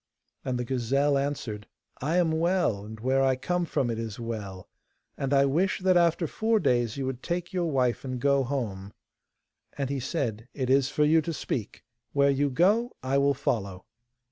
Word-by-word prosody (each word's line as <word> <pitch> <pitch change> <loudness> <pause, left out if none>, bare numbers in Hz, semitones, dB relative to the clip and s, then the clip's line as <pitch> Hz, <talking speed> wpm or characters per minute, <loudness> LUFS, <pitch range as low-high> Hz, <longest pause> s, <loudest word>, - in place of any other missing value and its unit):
And 130 -1 -2
the 125 - -2
gazelle 135 +4 +1
answered: 135 -7 -3 0.3
'I 155 +6 0
am 170 -3 +3
well, 160 - +1
and 110 +1 -9
where 130 +4 +1
I 135 -1 +3
come 175 +7 -1
from 130 -6 0
it 115 - -3
is 115 -2 -5
well, 105 -5 -6 0.5
and 135 -1 -3
I 140 -1 +5
wish 170 +8 +1
that 185 0 +3
after 170 0 +3
four 220 +7 +1
days 120 - +1
you 135 - -2
would 130 -1 -4
take 175 +1 -3
your 175 -2 0
wife 125 -4 +1
and 130 -2 -4
go 140 +1 +3
home.' 105 -7 -4 0.8
And 140 -1 -2
he 140 - -1
said: 120 -5 -3
'It 130 -2 -1
is 135 0 +4
for 150 +1 +1
you 160 +2 +4
to 165 +2 -4
speak. - - -4 0.3
Where 140 0 +4
you 140 +1 +1
go, 205 - +2
I 135 +1 +1
will 140 0 +3
follow. 100 -7 -2
135 Hz, 190 wpm, -27 LUFS, 120-160 Hz, 0.8 s, I